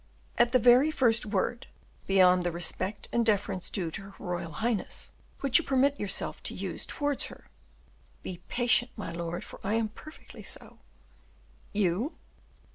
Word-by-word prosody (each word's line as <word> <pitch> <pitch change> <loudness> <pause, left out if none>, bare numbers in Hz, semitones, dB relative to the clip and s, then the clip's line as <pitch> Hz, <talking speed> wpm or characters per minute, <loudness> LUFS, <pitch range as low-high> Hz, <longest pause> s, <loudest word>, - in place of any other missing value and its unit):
"At 240 0 +5
the 255 - +6
very 250 +5 +6
first 235 -7 +2
word, 215 +4 -1 0.4
beyond 185 -2 +6
the 175 0 0
respect 185 +4 -2
and 235 - +3
deference 200 -4 0
due 175 -5 -1
to 195 - -4
her 195 0 -11
royal 175 -3 -4
highness, 225 -2 -2 0.3
which 275 0 +5
you - - -3
permit 275 +1 +2
yourself 205 - -1
to - - -3
use - - -4
towards 290 -2 0
her, - - -14 0.7
be 180 -1 -6
patient 240 0 +2
my 210 - -5
lord, 170 +1 -4
for - - -11
I 205 +3 0
am 225 -1 +1
perfectly 310 +8 -12
so." - - -7 0.9
"You?" 205 - 0
215 Hz, 155 wpm, -29 LUFS, 185-245 Hz, 0.9 s, the